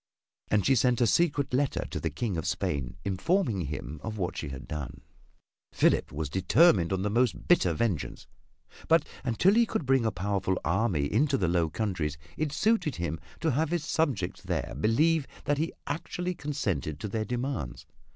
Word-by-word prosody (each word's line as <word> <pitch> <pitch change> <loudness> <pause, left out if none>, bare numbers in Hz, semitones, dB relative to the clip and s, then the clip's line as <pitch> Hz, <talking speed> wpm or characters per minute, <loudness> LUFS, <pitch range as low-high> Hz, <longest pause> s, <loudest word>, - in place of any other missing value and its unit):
And 105 -2 +2
she 135 - +5
sent 125 -1 +3
a 120 - +4
secret 140 +2 +2
letter 135 +1 +1
to - - -3
the - - -1
King 115 -6 -3
of 80 - -3
Spain, 65 -3 -2
informing 100 - +1
him 75 0 -5
of 110 +4 -5
what 90 -3 -2
she 75 - -4
had 65 -1 -8
done. 75 -4 -6 0.7
Philip - - +2
was 75 0 -3
determined 95 - +4
on 95 0 0
the 105 - 0
most 120 +1 +1
bitter 175 - +4
vengeance, 95 -1 -2 0.6
but 165 -1 +4 0.2
until 130 - +3
he 230 +1 +4
could 160 - -2
bring 135 -1 +3
a 110 - +1
powerful 95 0 -1
army 85 -4 +1
into 135 - +2
the 90 - +1
Low 85 -1 +2
Countries 85 -7 -2 0.2
it 155 -2 -1
suited 195 - +1
him 85 -2 -3 0.2
to 165 - +2
have 150 +4 +1
his 170 -2 -1
subjects 140 - -1
there - - -3
believe 150 - +3 0.2
that 145 0 +1
he 160 - +2
had 145 - -5
actually 180 +1 -4
consented 100 - -3
to - - -4
their 110 +2 -2
demands. 120 - -3
110 Hz, 180 wpm, -29 LUFS, 85-145 Hz, 0.7 s, she